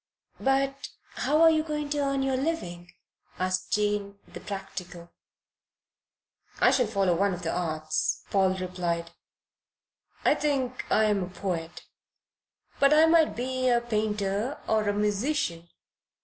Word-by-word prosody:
"But 275 +1 0 0.2
how 305 +2 +2
are 325 - +8
you 315 -1 +2
going 300 -2 -4
to 295 - 0
earn 275 -1 0
your 270 -1 0
living?" 175 - -3 0.5
asked 185 0 -2
Jane, 205 -1 0
the - - -10
practical. 180 -3 -7 1.5
"I - - +5
shall 250 -4 +2
follow 195 -4 +1
one 195 +1 +1
of 175 - -10
the 165 - -1
arts," 155 -3 -1
Paul 190 -1 +3
replied. 175 -2 -3 1.1
"I - - +6
think 265 -4 -2
I 220 - +4
am 210 -2 +2
a 180 - -4
poet, 175 -3 -4 1.0
but 280 +2 +5
I 315 +1 +7
might 325 -1 +4
be 255 +1 -1
a 240 -1 +4
painter 215 +1 -2
or 215 -1 +1
a - - +1
musician." 210 - -1
210 Hz, 135 wpm, -27 LUFS, 185-270 Hz, 1.5 s, are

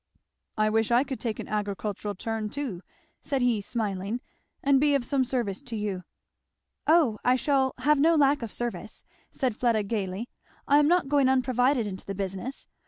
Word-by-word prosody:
"I 215 0 +3
wish 225 0 +2
I 240 +2 +4
could 270 -2 -5
take 225 -3 -2
an - - -6
agricultural 205 0 -3
turn 220 +2 -3
too," 250 -9 -4 0.4
said 275 -3 -1
he 235 -4 +2
smiling, 205 0 -3 0.4
"and 275 -1 +4
be 290 -1 +4
of 265 -3 0
some 270 0 +1
service 240 -5 -2
to 250 -5 -7
you." 200 -4 -3 0.8
"O 305 -10 +4
I 250 +1 +4
shall 265 0 +1
have 290 +3 +3
no 330 +3 +5
lack 285 -2 +3
of 230 -3 -5
service," 240 -1 -5 0.3
said 255 -5 -1
Fleda 230 -3 +1
gayly; 200 +1 -3 0.4
"I 285 +1 +6
am 295 - +4
not 350 -2 +3
going 275 -2 +3
unprovided 255 -1 +2
into 190 -2 -6
the 195 - -4
business. 195 +7 -5
240 Hz, 175 wpm, -27 LUFS, 210-275 Hz, 0.8 s, I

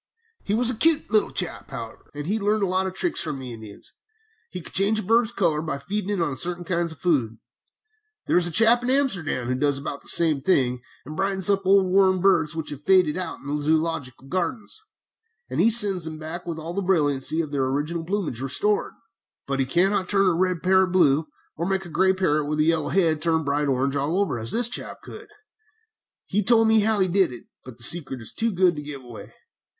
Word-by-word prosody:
"He 205 - -1
was 245 +2 +3
a - - -5
cute 315 +6 +1
little 215 -2 +2
chap, - - -4
however, - - -9
and 145 0 -6
had 210 +5 -2
learned 210 +1 0
a - - +3
lot 185 +1 -1
of 190 - -7
tricks 350 - 0
from 155 -3 -3
the 130 -2 -8
Indians. 110 -2 -12 0.6
He 180 - -7
could 165 - -11
change 205 +3 +3
a - - -4
bird's 230 +3 +2
color 170 -9 0
by 155 -3 -4
feeding 200 +7 -4
it 205 -2 -1
on 150 -5 -1
certain 175 +5 0
kinds 170 -1 -2
of 160 - -11
food. 130 -11 -1 0.9
There - - 0
is 175 -1 +5
a - - -3
chap 230 +6 +5
in 245 - -3
Amsterdam 195 - 0
who 125 - -1
does 140 +2 +1
about 140 0 -6
the - - -18
same 160 -5 +2
thing 130 -6 +1 0.2
and 150 +3 -8
brightens 195 +1 +1
up 195 -1 -1
old 195 0 +5
worn 190 0 +3
birds 175 -5 +2
which 160 -2 -5
have 145 -1 -8
faded 185 -3 +3
out 185 0 -5
in - - -17
the 145 +1 -3
Zoölogical 155 -5 -2
Gardens, 185 - -3 0.7
and - - 0
sends 200 -6 +6
them 160 -1 -6
back 160 +3 -8
with 165 -2 -4
all 160 +2 -6
the 200 - -2
brilliancy 155 -5 0
of 155 -3 -3
their 135 -2 -1
original 150 +5 -3
plumage 175 - -3
restored; 145 +11 0 0.5
but 135 0 -3
he 135 - 0
cannot 185 +5 +1
turn 195 -1 +2
a - - +1
red 180 0 -1
parrot 190 0 +3
blue, 160 -4 +2 0.3
or 170 +2 -3
make 190 0 -2
a - - -10
gray 190 +4 +2
bird 155 -6 0
with 150 +1 -3
a - - +4
yellow 160 -1 +1
head 165 -5 +1
turn 165 0 +2
to - - -7
bright 145 +1 -1
orange 135 +1 0
all 145 +7 -1
over, 170 -12 -1
as 110 +1 -5
this 235 0 +4
chap 250 - -5
could. 430 0 -11 1.0
He 205 +2 -1
told 225 +2 +4
me 220 0 +4
how 215 0 +1
he 190 - +2
did 185 -3 +1
it, 120 - -10 0.2
but 130 -3 -12
the 120 - -7
secret 135 -1 +1
is 115 - -8
too 230 0 +1
good 180 -2 +2
to 150 - -6
give 145 -2 -9
away. 120 -2 -12
170 Hz, 230 wpm, -23 LUFS, 145-195 Hz, 1.0 s, sends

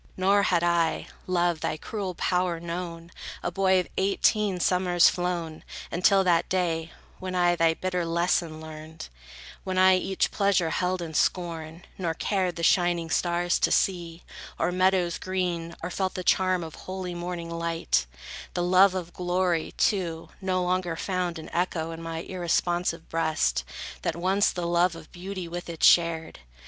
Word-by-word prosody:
Nor 195 +2 +4
had 180 -4 +2
I, 170 -2 +1 0.2
Love, 175 -2 +1
thy 155 - -2
cruel 190 +1 -5
power 180 -1 0
known, 170 0 -6 0.3
A 175 - -1
boy 190 0 +3
of 180 - -2
eighteen 200 0 +2
summers 180 -1 +4
flown, 175 -3 -3 0.3
until 195 +3 +4
That 175 -2 +2
day, 165 -3 -1 0.3
when 185 0 -4
I 175 -1 +3
thy 165 -1 +3
bitter 180 0 -2
lesson 170 -1 0
learned; 155 - -9 0.5
When 185 -1 -3
I 185 0 +6
each 190 +1 0
pleasure 195 -5 +2
held 180 +1 -1
in 160 -1 -7
scorn, 165 0 -1
nor 165 -3 -1
cared 185 -2 -1
The 170 - -5
shining 175 -1 +2
stars 175 +1 +1
to - - +2
see, 170 -3 0 0.3
or - - 0
meadows 185 -1 +2
green, 175 -3 -2
Or 180 - -3
felt 190 +1 -2
the 185 - -3
charm 185 -1 +2
of 160 -1 -8
holy 185 -1 -6
morning 175 -1 -5
light; 165 - 0 0.5
The 175 - 0
love 185 +2 +5
of 175 -2 -5
glory, 180 -2 0
too, 170 -5 0
no 185 -1 0
longer 180 -1 0
found 180 -1 -2
An 160 - -8
echo 170 -2 -1
in 165 0 -7
my 165 0 -4
irresponsive 175 -1 -1
breast, 155 - 0 0.4
That, 165 - -1
once, 190 +4 +2
the 175 -1 -4
love 170 0 +2
of 160 -1 -12
beauty 185 0 -6
with 175 +1 -6
it 165 -2 -6
shared. 165 -2 +4
175 Hz, 160 wpm, -26 LUFS, 165-185 Hz, 0.5 s, I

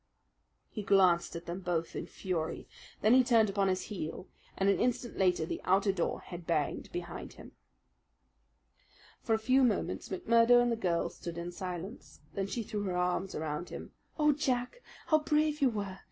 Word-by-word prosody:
He 215 - -4
glanced 185 -4 +3
at 170 +1 -6
them 175 +2 -4
both 175 -3 -2
in - - -4
fury. 170 -4 -3 0.3
Then 215 +3 +5
he 260 0 +7
turned 225 -4 +4
upon 195 0 +1
his 185 -1 0
heel, 180 -2 -6 0.3
and 195 - +1
an 200 - +3
instant 245 -1 0
later 180 -4 +2
the - - -4
outer 195 +2 +3
door 180 -3 -2
had 175 -2 -9
banged 155 -4 -1
behind 175 0 -6
him. - - -13 1.7
For 225 - +1
a - - +1
few 255 +4 +3
moments 225 -6 0
McMurdo 230 +5 +4
and 240 0 +2
the - - +2
girl 175 -6 0
stood 170 -1 -7
in 170 +1 -4
silence. 185 +3 -7
Then 195 -1 -2
she 230 +3 -3
threw 210 0 -4
her 180 -2 -1
arms 180 +1 -1
around 155 +2 -3
him. - - -8 0.3
"Oh, 300 -1 +4
Jack, 270 - -1 0.2
how 310 - +4
brave 300 0 +1
you 270 - +5
were! 200 -4 -4
195 Hz, 180 wpm, -31 LUFS, 175-235 Hz, 1.7 s, he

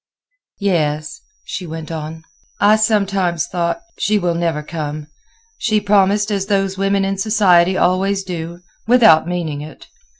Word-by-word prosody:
"Yes," 155 - -1 0.2
she 180 - -6
went 160 0 -7
on; 160 0 -6 0.4
"I 210 +1 +5
sometimes 200 -6 +1
thought: 175 - -2 0.2
'She 210 +1 +2
will 175 -3 0
never 165 -3 -1
come. 150 -1 -5 0.5
She 215 -2 +1
promised 205 0 +2
as 195 -1 -1
those 195 -2 0
women 195 0 +1
in 195 0 -2
society 190 -4 +3
always 195 +2 +1
do, 170 -1 -6 0.3
without 220 -10 +5
meaning 165 -5 -3
it. 155 +1 -11
185 Hz, 135 wpm, -18 LUFS, 165-200 Hz, 0.5 s, I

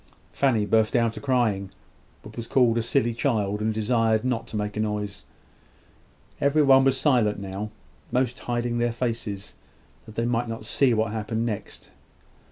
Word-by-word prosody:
Fanny 120 -7 +2
burst 110 +1 +2
out 115 -1 +2
a - - -7
crying, 115 -8 +1 0.5
but 110 0 -12
was 115 -1 -6
called 120 -3 +3
a - - +1
silly 120 0 +1
child, 105 -5 0
and 110 +1 +1
desired 110 +1 +1
not 125 -3 -1
to 110 - -5
make 105 0 -3
a - - -3
noise. 105 -2 -3 1.2
Everyone 140 -2 +5
was 135 0 +3
silent 125 -8 +2
enough 100 -1 -6
now; 105 +3 -4 0.4
most 125 0 0
hiding 120 0 -2
their 120 -1 +1
faces, 115 -5 -4 0.5
that 110 - -12
they 115 - 0
might 120 0 0
not 115 -1 -6
see 135 +3 +2
what 110 0 0
happened 110 +1 -2
next. 110 -4 -6
115 Hz, 170 wpm, -25 LUFS, 105-125 Hz, 1.2 s, Everyone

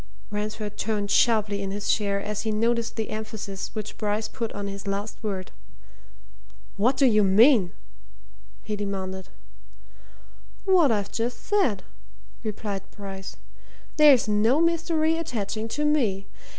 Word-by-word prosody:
Ransford 210 0 -4
turned 210 -2 -1
sharply 210 -3 +3
in 195 - -3
his 205 +1 -4
chair 200 -2 +1
as 210 +1 -3
he 220 - -2
noticed 230 +2 0
the 220 -2 -3
emphasis 215 -2 -5
which 215 -1 -6
Bryce 210 +1 -1
put 230 -1 -4
on 205 0 -4
his 200 0 -6
last 200 +2 -4
word. 195 -4 -4 1.2
"What 245 +6 +2
do 275 - +5
you 215 -4 +5
mean?" 205 0 +5 0.9
he 210 - -3
demanded. 190 -2 -4 1.4
"What 360 -8 +5
I've 205 -2 -1
just 235 +1 -3
said," 360 - +1 0.6
replied 210 -2 -3
Bryce. 195 -2 -8 0.6
"There's 290 -7 +7
no 215 +7 +3
mystery 330 -1 +2
attaching 225 -7 -3
to 295 +6 -2
me. 225 -11 +1
215 Hz, 130 wpm, -25 LUFS, 200-235 Hz, 1.4 s, There's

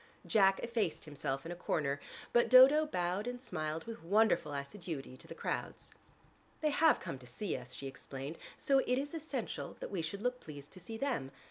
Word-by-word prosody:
Jack 195 -2 +4
effaced 230 -8 -1
himself 135 -2 -3
in 165 - -5
a - - -4
corner, 145 -4 -1 0.3
but 240 - +5
Dodo 275 +5 +8
bowed 180 -2 -1
and 245 0 -3
smiled 160 -9 -3
with 230 0 -7
wonderful 200 -4 +3
assiduity 140 -1 -5
to - - -14
the - - -8
crowds. - - -4 0.7
"They 305 -1 +2
have 320 +2 +5
come 135 - -5
to 125 - -12
see 170 - -3
us," 125 0 -8
she 140 - -7
explained. 135 +2 -6 0.2
"So 275 -1 +3
it 250 -1 +1
is 280 +3 -2
essential 300 -7 -4
that - - -6
we 190 -4 -1
should 195 +6 -4
look 250 0 0
pleased 145 -2 -10
to - - -10
see 225 +6 -7
them. 235 - -1
185 Hz, 195 wpm, -34 LUFS, -, 0.7 s, Dodo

